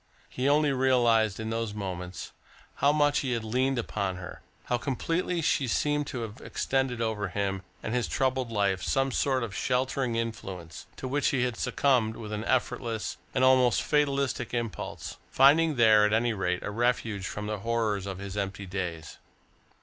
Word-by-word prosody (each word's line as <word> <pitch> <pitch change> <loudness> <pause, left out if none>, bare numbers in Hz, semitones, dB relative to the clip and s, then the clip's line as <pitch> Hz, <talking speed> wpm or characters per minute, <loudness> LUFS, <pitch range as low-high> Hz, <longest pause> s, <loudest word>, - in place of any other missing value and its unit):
He 130 +2 0
only 145 0 +4
realised 120 -5 +3
in 110 0 -3
those 115 -2 -2
moments 90 -3 -5 0.5
how 140 - +4
much 145 -1 +3
he 130 -3 -1
had 115 -2 -2
leaned 130 +4 0
upon 100 -5 -2
her, 90 0 -9 0.2
how 125 - -1
completely 165 +6 -1
she 145 -3 +2
seemed 145 +3 0
to 125 - -4
have 115 +1 -7
extended 130 -3 -1
over 110 -3 -1
him 95 0 -2 0.2
and 110 - -3
his 125 -1 0
troubled 130 -2 0
life 100 -3 +1
some 135 +7 +1
sort 130 0 +1
of 110 -4 -5
sheltering 130 -1 0
influence, 95 -8 -5
to 130 - -6
which 140 +2 +1
he 130 -2 +1
had 125 -2 -1
succumbed 125 -2 +1
with 105 -2 -7
an 105 0 -3
effortless, 120 -3 -1 0.2
an 130 - +2
almost 130 -2 +5
fatalistic 140 -5 0
impulse, 115 -3 -4
finding 150 +4 +5
there, 110 -3 +6
at 105 0 +3
any 115 +1 +2
rate, 90 -3 -1
a - - -3
refuge 110 -3 0
from 105 0 -5
the 105 -1 -3
horrors 110 -3 -1
of 95 -2 -4
his 100 0 -7
empty 100 0 -3
days. 90 -5 -5
115 Hz, 175 wpm, -28 LUFS, 105-130 Hz, 0.5 s, there